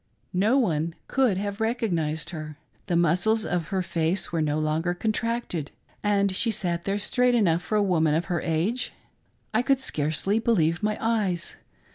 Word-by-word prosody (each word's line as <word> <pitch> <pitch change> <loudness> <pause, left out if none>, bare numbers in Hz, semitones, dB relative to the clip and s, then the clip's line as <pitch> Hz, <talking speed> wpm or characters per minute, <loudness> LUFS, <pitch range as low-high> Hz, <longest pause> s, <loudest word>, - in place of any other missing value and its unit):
No 210 +8 +3
one 165 - 0
could 255 -8 +2
have 200 +2 -3
recognised 175 -9 -1
her. 155 -3 -7 0.3
The 175 - 0
muscles 180 +7 +2
of 175 -2 -1
her 190 -1 -1
face 170 +1 -1
were, 165 -2 0
no 150 -1 0
longer 155 +3 0
contracted, 220 - -2 0.3
and 200 -2 +2
she 230 - +2
sat 180 -5 -2
there 195 +1 0
straight 245 +4 +2
enough 175 -7 +3
for 215 - -3
a 210 - +4
woman 160 -5 +2
of 165 +2 0
her 175 -3 -1
age. 180 +10 -1 0.6
I - - +3
could 270 +1 +2
scarcely 160 - 0
believe 175 -8 +2
my 210 0 0
eyes. 210 -7 -1
185 Hz, 165 wpm, -26 LUFS, 165-220 Hz, 0.6 s, a